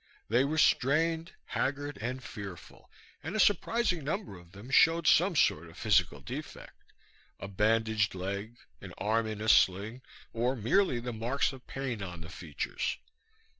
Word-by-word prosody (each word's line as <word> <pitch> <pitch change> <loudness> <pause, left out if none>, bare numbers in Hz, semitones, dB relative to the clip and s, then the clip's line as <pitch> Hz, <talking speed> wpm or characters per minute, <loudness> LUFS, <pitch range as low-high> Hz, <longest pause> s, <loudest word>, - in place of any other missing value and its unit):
They 120 +4 +4
were 150 +3 -1
strained, 160 +4 +2
haggard 145 -2 -2
and 130 +3 -4
fearful, 100 -8 -10 0.3
and 160 +7 -5
a - - 0
surprising 205 -3 +2
number 170 - -3
of 85 -1 -15
them 100 +7 -11
showed 165 +3 +5
some 180 +4 +4
sort 85 - +2
of 80 - -16
physical 95 -7 +2
defect, - - -9 0.5
a - - -6
bandaged 110 +1 +1
leg, 100 +5 -5 0.2
an 95 -3 -10
arm 110 +2 0
in 110 -1 -5
a 110 - -3
sling 105 +4 +3 0.3
or 120 +3 0
merely 125 - +2
the 120 0 -5
marks 120 +6 0
of 130 -1 -13
pain 130 -6 -4
on 85 -3 -6
the 80 - -9
features. 80 -3 -4
115 Hz, 155 wpm, -30 LUFS, 100-145 Hz, 0.5 s, showed